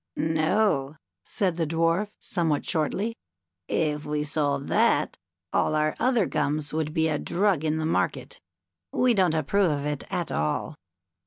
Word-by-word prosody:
"No," 155 -2 +1 0.3
said 185 -4 -1
the 165 -2 0
Dwarf, 165 +6 0
somewhat 160 -5 -1
shortly; 190 +8 0 0.5
"if 150 -2 0
we 150 -1 -2
sold 145 -2 -1
that, - - +2 0.3
all 155 - +2
our 155 0 +1
other 245 -5 +3
gums 150 0 -1
would 155 -1 -1
be 160 +1 +1
a 150 -2 0
drug 185 -4 +1
in 155 0 0
the 160 - -1
market. 160 - -1 0.5
We 250 -1 +3
don't 185 -6 +2
approve 175 +5 +2
of 145 -1 -1
it 150 -1 -2
at 175 - -2
all. 75 0 -1
160 Hz, 150 wpm, -26 LUFS, 150-180 Hz, 0.5 s, other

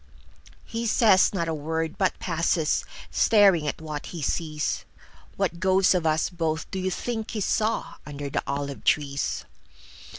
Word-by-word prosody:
He 230 +1 -3
says 210 -4 +5
not 170 -4 -1
a 165 - -1
word, 160 +1 -2
but 190 -2 0
passes, 165 -2 0 0.3
Staring 195 -8 +4
at - - -2
what 155 -2 -6
he 170 -4 -6
sees. 155 +1 -1 0.5
What 170 - -1
ghost 190 +1 +4
of 175 -3 +1
us 155 0 +2
both 165 -2 -2
do 190 - -3
you 185 0 0
think 220 +3 -3
he 220 - -3
sawUnder 145 -10 -2
the - - +1
olive 140 0 -3
trees? 145 -1 0
165 Hz, 145 wpm, -26 LUFS, 150-190 Hz, 0.5 s, says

